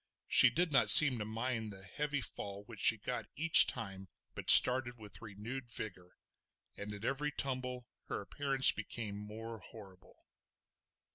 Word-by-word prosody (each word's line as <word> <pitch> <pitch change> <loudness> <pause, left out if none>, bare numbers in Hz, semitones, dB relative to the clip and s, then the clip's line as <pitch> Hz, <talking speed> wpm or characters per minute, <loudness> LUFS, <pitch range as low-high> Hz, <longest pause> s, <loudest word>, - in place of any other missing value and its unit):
She - - +3
did 175 0 -4
not 135 - -1
seem 135 -6 +7
to 105 - -8
mind 115 0 -8
the 95 -1 -10
heavy 145 +8 -7
fall 100 -4 -8
which 110 -1 -16
she 110 - +2
got 125 +4 -9
each 165 +2 +4
time 95 -5 -8 0.3
but - - -9
started 125 -1 +6
with 105 -3 -14
renewed 115 +4 -12
vigour; 90 -6 -10 0.6
and 105 +1 -11
at 105 +2 -12
every 145 +3 -6
tumble 125 -3 -7 0.2
her - - -8
appearance 135 -2 +2
became 105 -1 -10
more 110 +2 -12
horrible. 95 -1 -18
115 Hz, 150 wpm, -30 LUFS, 105-130 Hz, 0.6 s, seem